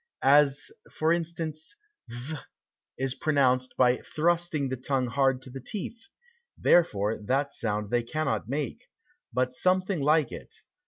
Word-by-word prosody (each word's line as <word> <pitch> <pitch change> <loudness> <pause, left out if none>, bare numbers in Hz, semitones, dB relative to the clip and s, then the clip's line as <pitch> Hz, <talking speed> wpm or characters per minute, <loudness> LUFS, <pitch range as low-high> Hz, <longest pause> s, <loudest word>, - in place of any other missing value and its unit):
As 140 0 +4 0.2
for 160 +1 +2
instance 165 - -4 0.3
th 130 +6 -6 0.6
is 135 0 -1
pronounced 130 -4 +1
by 125 -1 +4
thrusting 165 -3 0
the 130 - -1
tongue 130 +1 -1
hard 135 +1 +1
to 130 - -10
the 135 +1 -7
teeth, 220 - -7 0.5
therefore 110 - +3
that 140 +4 0
sound 105 -2 -2
they 120 0 +3
cannot 115 -4 -2
make, 150 - -3 0.5
but 125 +1 0
something 185 +3 +1
like 150 -1 +3
it. - - -9
140 Hz, 130 wpm, -28 LUFS, 125-160 Hz, 0.6 s, As